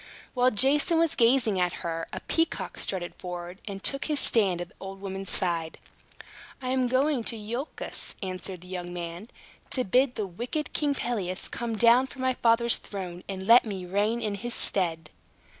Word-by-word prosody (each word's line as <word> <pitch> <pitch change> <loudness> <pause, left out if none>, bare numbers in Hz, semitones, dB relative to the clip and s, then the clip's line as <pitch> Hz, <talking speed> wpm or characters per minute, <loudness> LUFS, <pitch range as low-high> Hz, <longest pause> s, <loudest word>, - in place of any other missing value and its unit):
While 250 0 +4
Jason 280 - +4
was 330 -1 +3
gazing 230 -4 +3
at 180 -1 +1
her, 165 -1 -3
a - - -6
peacock 330 0 -1
strutted 180 -3 -2
forward, 180 0 -7
and 195 -1 -6
took 275 0 0
his 300 -2 0
stand 195 -10 +4
at 175 0 -5
the - - -25
old 195 0 -8
woman's 195 0 -5
side. 165 -3 +1 0.8
"I 255 -2 -4
am 255 -1 +1
going 260 0 +1
to 230 - +1
Iolchos," 235 +7 -5
answered 185 -1 -5
the 180 - -13
young 175 -1 -6
man, 175 +5 -6 0.4
"to 255 - +2
bid 250 +4 +2
the 210 - -2
wicked 240 - -4
King 290 -2 0
Pelias 200 -8 -2
come 235 -1 -4
down 235 +4 +5
from 260 0 -8
my 260 0 +2
father's 235 -1 +4
throne, 180 -3 -7
and 190 -1 -5
let 235 +4 +7
me 195 -5 -5
reign 210 +6 0
in 210 -2 -1
his 235 +4 -4
stead." 165 -4 0
210 Hz, 180 wpm, -27 LUFS, 185-250 Hz, 0.8 s, let